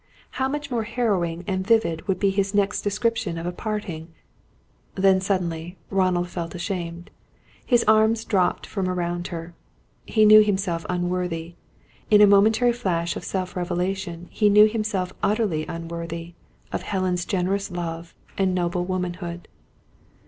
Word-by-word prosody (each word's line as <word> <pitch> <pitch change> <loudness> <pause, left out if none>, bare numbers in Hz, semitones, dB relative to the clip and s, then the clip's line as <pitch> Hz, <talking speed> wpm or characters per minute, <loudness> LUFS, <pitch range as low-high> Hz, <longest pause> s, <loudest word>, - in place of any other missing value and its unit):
How 265 - +3
much 290 0 -4
more 235 -2 0
harrowing 200 -7 -1
and 185 +1 -2
vivid 220 -9 +2
would 190 - +1
be 200 -1 +2
his 195 +1 -1
next 205 0 +1
description 210 -3 -1
of 165 - -5
a 175 - -1
parting 180 -5 -4 0.9
Then, 190 -1 +4
suddenly, 175 -2 -2
Ronald 185 -2 +1
felt 170 -1 -5
ashamed. 175 -2 -5 0.5
His 240 -3 +3
arms 220 +1 +3
dropped 185 -3 +1
from 190 -3 -2
around 175 -1 -2
her. 170 0 -7 0.5
He 215 -1 +4
knew 215 0 +9
himself 190 -5 -1
unworthy 175 -2 -2 0.6
in 210 - +6
a 210 - +9
momentary 220 +4 +4
flash 170 -8 -1
of - - -6
self 185 -1 -3
revelation 180 0 -3
he 210 -2 +3
knew 210 +1 +8
himself 210 -4 -2
utterly 200 -7 0
unworthy 170 0 -6 0.4
of - - -2
Helen's 185 -3 -1
generous 195 +2 -1
love, 170 -1 -5 0.2
and 190 -1 +2
noble 175 0 0
womanhood. 175 -1 -4
185 Hz, 140 wpm, -24 LUFS, 175-210 Hz, 0.9 s, knew